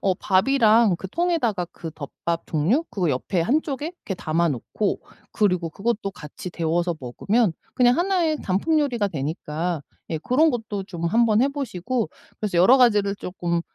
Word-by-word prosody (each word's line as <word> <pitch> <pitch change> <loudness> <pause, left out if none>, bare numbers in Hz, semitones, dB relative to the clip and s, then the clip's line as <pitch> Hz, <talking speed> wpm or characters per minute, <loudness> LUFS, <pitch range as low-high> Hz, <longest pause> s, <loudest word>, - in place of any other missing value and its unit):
어 195 - +2
밥이랑 215 +1 +4
그 190 - -7
통에다가 250 - 0
그 165 -2 -8
덮밥 165 +3 -4
종류 170 - +2
그 180 -4 -1
옆에 150 +7 -1
한 270 - +2
쪽에 295 +4 -4
이렇게 200 - -6
담아 170 0 0
놓고 155 - -2 0.3
그리고 180 -6 +1
그것도 205 +1 -2
같이 170 0 -9
데워서 170 +1 -1
먹으면 195 - 0 0.2
그냥 245 -1 +5
1 365 0 +1
의 310 -2 0
단품 305 - +1
요리가 240 -8 0
되니까 155 +1 -3 0.3
예 160 - -1
그런 285 - +3
것도 220 -6 -4
좀 175 -3 -6
한번 225 +4 +3
해 275 - +3
보시고 250 - -2 0.3
그래서 205 -5 -2
여러 235 +10 +7
가지를 210 -5 +4
쪼끔 175 -3 -2
200 Hz, 325 characters per minute, -23 LUFS, 170-245 Hz, 0.3 s, 여러